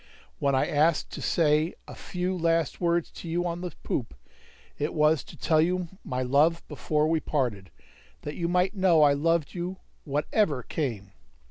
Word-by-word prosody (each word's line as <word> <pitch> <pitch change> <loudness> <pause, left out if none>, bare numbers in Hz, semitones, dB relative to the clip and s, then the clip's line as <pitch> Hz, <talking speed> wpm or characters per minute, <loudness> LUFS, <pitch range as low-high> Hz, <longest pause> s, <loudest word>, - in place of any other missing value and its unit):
When 140 -1 +2
I 130 - +2
asked 155 +2 +2
to - - -6
say 155 0 +2
a - - -9
few 180 +1 -3
last 165 -3 0
words 170 -1 +1
to 170 - -9
you 175 +2 0
on 170 0 -3
the 180 - -3
poop, 115 - -3 0.6
it 150 +3 -2
was 150 -2 +3
to - - -13
tell 155 -1 +3
you 180 +1 0
my 130 0 -2
love 150 +6 +2
before 150 +2 0
we 160 0 +2
parted, 120 - -2 0.5
that 150 - -4
you 170 +1 -2
might 180 +3 +2
know 185 -6 +4
I 145 -1 +6
loved 160 0 +1
you 180 +1 -4 0.3
whatever 145 - 0
came. 110 -11 -4
160 Hz, 170 wpm, -27 LUFS, 145-175 Hz, 0.6 s, I